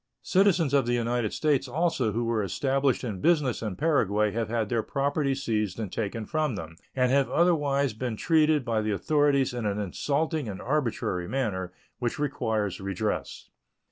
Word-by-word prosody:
Citizens 185 -7 +3
of 135 -4 +3
the 120 - +2
United 120 -2 0
States 145 -3 +1
also 140 -4 0
who 115 +3 -1
were 115 -2 0
established 135 +8 0
in 105 -7 -4
business 150 -8 +2
in 105 -4 -3
Paraguay 105 - +2
have 110 0 -2
had 115 -2 0
their 115 +1 0
property 140 +2 0
seized 110 -7 -2
and 105 -5 -4
taken 110 0 -3
from 155 -4 -1
them, 80 -3 -7 0.2
and 125 -1 +2
have 140 0 +3
otherwise 145 -6 +2
been 120 +1 -3
treated 155 -3 +3
by 115 -2 0
the 110 - -2
authorities 140 +4 +2
in 120 -1 -3
an 100 0 -1
insulting 145 - -1
and 95 - -6
arbitrary 115 -10 -1
manner, 95 -9 -2 0.3
which 120 -2 -2
requires 110 -9 -1
redress. 100 +2 -3
125 Hz, 170 wpm, -27 LUFS, 105-145 Hz, 0.3 s, Citizens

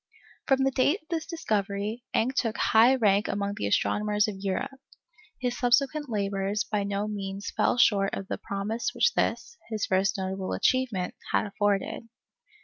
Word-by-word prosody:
From 270 -1 +3
the 270 - +2
date 285 +8 +2
of 315 - -37
this 325 -2 -2
discovery, 215 - -2
Encke 250 +4 +2
took 230 -4 -1
high 230 +4 +5
rank 210 -4 +3
among 200 0 -2
the 100 - -2
astronomers 210 - +1
of 200 -3 -5
Europe. 265 +8 -3 0.6
His 245 -1 -1
subsequent 275 +4 +1
labours 200 -1 -1
by 210 -1 -1
no 200 +1 -2
means 200 -1 -5
fell - - +2
short 200 -5 +3
of 195 - -6
the - - -4
promise 215 - -3
which 480 - +3
this, 470 - -1
his 220 -2 -1
first 195 +3 +1
notable 190 0 -3
achievement, 245 -9 0 0.2
had - - +2
afforded. 205 +2 -1
210 Hz, 160 wpm, -27 LUFS, 200-250 Hz, 0.6 s, high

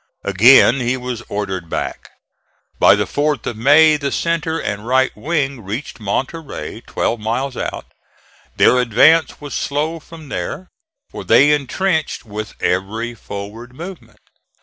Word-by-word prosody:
Again 120 +6 +6
he 125 +1 0
was 125 -2 -5
ordered 95 -4 -4
back. - - -4 0.7
By - - +7
the - - 0
4th 150 0 -1
of 120 - -3
May 150 +7 +5
the 140 -1 -3
centre 165 -1 -1
and 105 -3 -4
right 130 +1 +2
wing 140 0 -2
reached 110 +10 -6
Monterey, 130 +9 -4
twelve 115 - -1
miles 125 +5 -2
out. - - -4 0.7
Their 125 - +5
advance 135 +8 +4
was 145 -1 -8
slow 155 +3 -2
from 160 -1 -13
there, 185 +6 -5 0.4
for - - -7
they 145 +2 +5
intrenched 155 +2 -1
with 110 0 -7
every 110 +6 -1
forward 110 +3 -9
movement. 175 +4 -10
130 Hz, 135 wpm, -18 LUFS, 110-150 Hz, 0.7 s, By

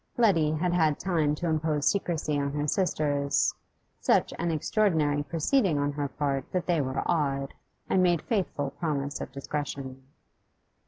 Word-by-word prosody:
Letty 165 -10 +3
had 175 +3 0
had 160 -4 +2
time 160 -6 +1
to 170 - -3
impose 155 -2 0
secrecy 160 -7 0
on 140 0 -2
her 145 0 -1
sisters, 145 -5 +1 0.5
such - - +2
an 170 - 0
extraordinary 160 -3 +1
proceeding 165 - +1
on 145 0 0
her 145 0 -2
part 140 -1 -2
that 180 -2 0
they 170 -4 +2
were 130 0 -2
awed, 140 -5 0 0.3
and 190 - +3
made 175 -3 +2
faithful 175 - -1
promise 145 -1 -3
of - - -6
discretion. 140 -1 -5
150 Hz, 150 wpm, -28 LUFS, 145-170 Hz, 0.5 s, Letty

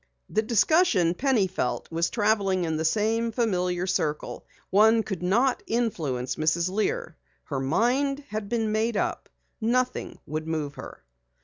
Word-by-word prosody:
The 215 - +2
discussion, 225 - +3
Penny 250 -1 +2
felt, 175 -9 -2
was 165 +1 0
traveling 205 -4 +1
in 160 -1 -1
the 160 - -1
same 220 +6 +1
familiar 180 -6 0
circle. 155 -5 -2 0.2
One 220 +3 +5
could 195 -5 -5
not 235 +9 +2
influence 160 - -1
Mrs. 165 +3 +1
Lear. 460 - -1 0.3
Her 140 -4 -4
mind 255 - +1
had 215 -1 -4
been 225 -2 0
made 220 +1 0
up. - - -2 0.3
Nothing 250 +3 0
would 155 +2 -4
move 155 -3 -2
her. 65 - -10
205 Hz, 140 wpm, -26 LUFS, 165-230 Hz, 0.3 s, One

